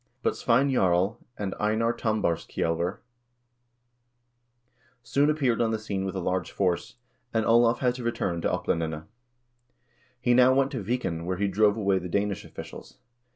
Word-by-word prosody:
But - - +1
Svein 130 +4 +2
Jarl 95 -3 +2 0.2
and 100 -2 -3
Einar 110 +2 +1
Tam 110 -2 -1
barskjselver 85 +2 -1 2.1
soon 140 +5 +2
appeared 135 -7 +1
on 115 - +2
the 110 - 0
scene 100 -3 -3
with 95 0 -4
a - - -1
large 90 -1 -1
force, 90 -3 -1 0.4
and 110 -1 +2
Olav 115 +1 +4
had 125 -1 +2
to 125 0 -7
return 95 -7 -1
to - - 0
Oplandene. 80 -3 -2 1.2
He 120 0 +2
now 130 +1 +6
went 135 0 +2
to 125 - -3
Viken, 95 -7 -2
where 90 0 -1
he 100 +2 +1
drove 105 +2 +3
away 100 -3 +2
the 90 0 -7
Danish 100 +2 -1
officials. - - -10
105 Hz, 155 wpm, -27 LUFS, 90-120 Hz, 2.1 s, now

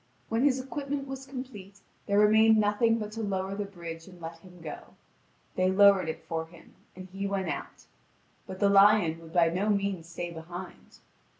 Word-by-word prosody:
When 230 +2 +1
his 265 -2 +3
equipment 275 +1 -4
was 270 0 -7
complete, 230 -7 -9 0.3
there 200 - +2
remained 220 +1 +6
nothing 215 +2 +2
but 210 -2 -5
to 225 +1 -5
lower 195 -2 -2
the 205 +1 -3
bridge 170 -4 -9
and 180 -2 -14
let 165 0 -8
him 180 0 -16
go. 155 -3 -9 0.6
They 185 0 +2
lowered 195 -2 +5
it 160 - -6
for 160 -1 -3
him, 170 0 -17 0.2
and 185 0 -9
he 195 +1 -3
went 195 -1 -2
out. - - -6 0.6
But 185 - -8
the 200 - +4
lion 195 -5 +5
would 165 0 -13
by 170 -2 +4
no 190 +5 -1
means 200 -5 -1
stay 170 +1 -5
behind. 175 +2 -10
195 Hz, 185 wpm, -28 LUFS, 175-215 Hz, 0.6 s, remained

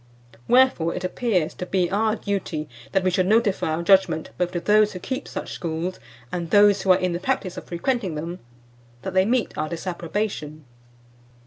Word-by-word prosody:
Wherefore 250 -10 +4
it 180 - -4
appears 185 -4 0
to 180 - -6
be 185 -2 +1
our 215 +2 +2
duty 185 -8 -3 0.2
that 190 - +1
we 185 - +2
should 185 +1 +1
notify 215 -2 +2
our 170 - -3
judgment 190 -4 +3
both 180 -1 0
to 175 - -1
those 210 +3 +3
who 180 - -6
keep 260 +8 -4
such - - -6
schools, 170 +2 -4 0.3
and 170 -2 -3
those 205 0 +5
who 195 - -3
are 185 - +6
in 180 -1 -1
the 170 - -2
practice 190 -5 -2
of 180 - -8
frequenting 185 - -2
them, 170 +4 -5 0.6
that 190 - -4
they 185 0 +4
meet 240 +2 0
our 155 - -1
disapprobation." 170 -2 -4
185 Hz, 185 wpm, -24 LUFS, 170-205 Hz, 0.6 s, are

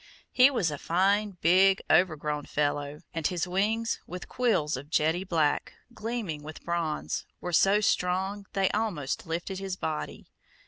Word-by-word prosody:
He 255 +2 +7
was 210 - 0
a 145 - -5
fine, 195 +3 +1
big, 190 +3 +5
overgrown 155 -3 +1
fellow, 145 0 -1
and 165 -2 0
his 180 -1 -2
wings, 215 +5 0
with 180 0 -7
quills 220 - +1
of 140 +3 -8
jetty 160 +3 +1
black, 160 -6 0 0.2
gleaming 220 -10 -4
with 155 +1 -10
bronze, 170 -3 -2
were 180 - -5
so 195 +5 +4
strong 190 +1 0
they 195 -1 +2
almost 190 -13 -2
lifted 175 +4 -3
his 195 -1 -4
body. 155 -4 -4
180 Hz, 145 wpm, -28 LUFS, 155-195 Hz, 0.2 s, He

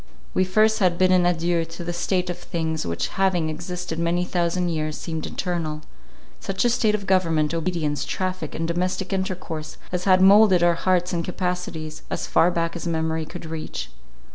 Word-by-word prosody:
We 185 - +2
first 215 +4 +3
had 180 -4 +2
bidden 185 -1 +4
adieu 170 -1 +1
to 165 +1 -8
the 175 0 -3
state 180 +1 0
of 175 - -7
things 160 - -3
which 85 0 -2
having 180 -5 +1
existed 175 +1 -5
many 170 +1 +1
thousand 175 0 0
years, 155 -2 -2
seemed 160 -2 -4
eternal; 165 -4 -3 0.6
such 195 +4 -1
a 240 - +4
state 220 -3 +2
of 200 -2 -5
government, 165 -5 +2
obedience, 165 -3 -1
traffic, 185 -4 -3
and 165 +1 -2
domestic 185 +3 -1
intercourse, 180 -5 -4
as 180 0 -2
had 185 -1 +5
moulded 195 -1 +6
our 175 0 +5
hearts 180 +1 +1
and 170 -1 0
capacities, 180 -3 -3
as - - -2
far 170 - +4
back 165 -1 -1
as 170 - -4
memory 160 -1 -1
could 175 - -8
reach. 160 - -5
175 Hz, 175 wpm, -24 LUFS, 160-185 Hz, 0.6 s, moulded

